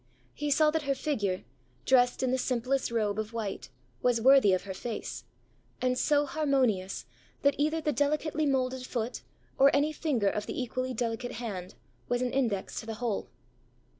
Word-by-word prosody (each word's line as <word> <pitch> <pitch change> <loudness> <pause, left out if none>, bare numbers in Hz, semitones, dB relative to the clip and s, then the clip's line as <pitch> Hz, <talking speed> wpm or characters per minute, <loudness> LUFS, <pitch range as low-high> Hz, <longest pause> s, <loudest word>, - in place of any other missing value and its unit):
He 295 0 -3
saw 305 +2 +4
that 320 0 0
her 275 - +3
figure, 205 -12 -1 0.4
dressed 250 0 +4
in 255 - +1
the 260 - +1
simplest 255 +2 0
robe 215 -3 0
of 215 +1 -4
white, 215 -9 -4 0.3
was 245 -2 +3
worthy 260 -3 +6
of 185 - +1
her 195 - -5
face; 225 +3 -5 0.5
and 255 0 +1
so 290 +3 +2
harmonious, 255 - 0 0.4
that 280 0 +5
either 310 +2 +2
the 305 - +1
delicately 300 +1 +1
moulded 260 -1 0
foot, 235 0 -3 0.4
or 275 +1 +8
any 295 +2 +2
finger 275 -10 0
of 210 +1 -3
the - - -4
equally 255 +1 -2
delicate 240 +1 -2
hand, 200 -6 -5 0.3
was 245 +1 +1
an 250 - -2
index 230 -8 -1
to 220 - -9
the 225 - -4
whole. 225 -3 -2
250 Hz, 170 wpm, -29 LUFS, 225-280 Hz, 0.5 s, or